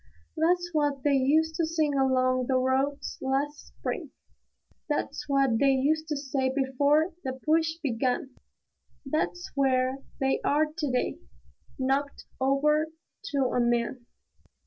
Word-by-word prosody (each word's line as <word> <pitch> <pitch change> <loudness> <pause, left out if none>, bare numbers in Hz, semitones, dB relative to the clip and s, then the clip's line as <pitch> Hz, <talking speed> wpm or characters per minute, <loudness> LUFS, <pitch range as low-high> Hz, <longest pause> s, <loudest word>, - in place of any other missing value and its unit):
That's 350 +2 +1
what 290 -3 0
they 290 - +3
used 300 +4 +3
to 335 - +2
sing 315 -3 +1
along 255 -2 +2
the 265 - +1
roads 265 +2 0
last 275 +3 -2
spring; - - -5 0.8
That's 295 0 -2
what 270 -5 +3
they 275 -1 +4
used 310 +4 +1
to 300 -2 -2
say 270 -1 -1
before 285 +5 +2
the 260 - -2
push 320 +1 +2
began; 255 0 -1 0.7
That's 310 +5 -2
where 260 -1 +1 0.2
they 270 0 +1
are 300 +2 +3
to 295 -5 -2
day, 250 - -1 0.6
knocked 275 +2 -1 0.2
over 300 +4 +3 0.4
to 300 -8 -3 0.2
a - - +2
man. 240 +1 0
275 Hz, 130 wpm, -28 LUFS, 260-300 Hz, 0.8 s, they